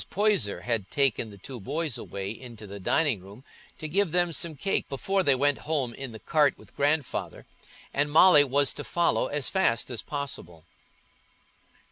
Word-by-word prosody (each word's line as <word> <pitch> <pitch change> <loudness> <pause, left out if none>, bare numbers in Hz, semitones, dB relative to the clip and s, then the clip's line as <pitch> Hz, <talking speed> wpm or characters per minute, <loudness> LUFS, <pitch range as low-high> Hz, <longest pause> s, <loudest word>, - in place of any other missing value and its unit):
Poyser 200 - +1
had 115 -4 -2
taken 135 -5 +1
the 100 - -12
two 125 +6 -9
boys 145 +5 -2
away 95 0 -5
into 115 -2 -10
the 100 0 -8
dining 135 - +1
room 100 +7 -14 0.3
to 155 - -5
give 190 +2 +1
them 175 0 +1
some 160 +1 -2
cake 195 +8 -1
before 195 +8 0
they 140 -7 +3
went 145 +2 +1
home 135 -7 0
in 135 0 -6
the 110 - -8
cart 145 +3 +2
with - - -18
Grandfather 145 -1 -1 0.5
and 145 +1 +1
Molly 160 -1 +8
was 140 0 +2
to 145 - -6
follow 170 +2 +1
as 145 -2 0
fast 130 -11 +1
as 120 - -4
possible. 90 - -6
140 Hz, 170 wpm, -27 LUFS, 115-160 Hz, 0.5 s, Molly